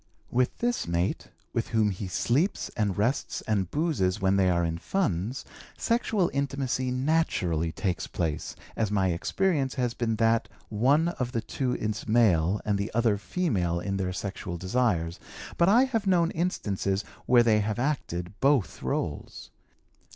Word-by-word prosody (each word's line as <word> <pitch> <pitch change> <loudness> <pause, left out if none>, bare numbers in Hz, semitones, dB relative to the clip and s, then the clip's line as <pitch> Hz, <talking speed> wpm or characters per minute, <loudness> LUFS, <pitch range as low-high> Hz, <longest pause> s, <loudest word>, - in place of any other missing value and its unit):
With 125 +1 +1
this 240 0 -1
mate, 85 +2 -1 0.2
with - - -1
whom 110 -2 +2
he 95 +1 -5
sleeps 135 - 0
and 105 -4 -1
rests 120 +7 0
and 100 -5 -1
'boozes' 145 - 0
when 95 -1 +2
they 95 -1 +3
are 85 -1 +2
in 85 0 -2
funds, 115 - -1 0.3
sexual 220 -6 +1
intimacy 135 -2 -1
naturally 125 - 0
takes 90 0 -2
place, 80 -4 -3 0.2
as 110 -3 0
my 95 -2 +2
experience 140 - 0
has 125 -3 0
been 115 -2 -1
that 115 +1 +2 0.2
one 140 +10 +3
of 125 -7 -4
the 115 - 0
two 125 +2 -2
is 110 0 -3
male 105 -5 +3
and 105 -2 +1
the 100 - -2
other 115 -4 +2
female 100 - 0
in 95 +2 -2
their 95 -1 -1
sexual 95 -2 -5
desires, 90 -4 0 0.4
but 170 +2 +4
I 235 +6 +6
have 225 -6 -1
known 175 -3 +3
instances 100 - -1 0.2
where 120 -1 +6
they 110 -2 +4
have 105 +1 -1
acted 110 - -2
both 135 -6 +2
roles. - - -4
110 Hz, 155 wpm, -27 LUFS, 95-140 Hz, 0.4 s, I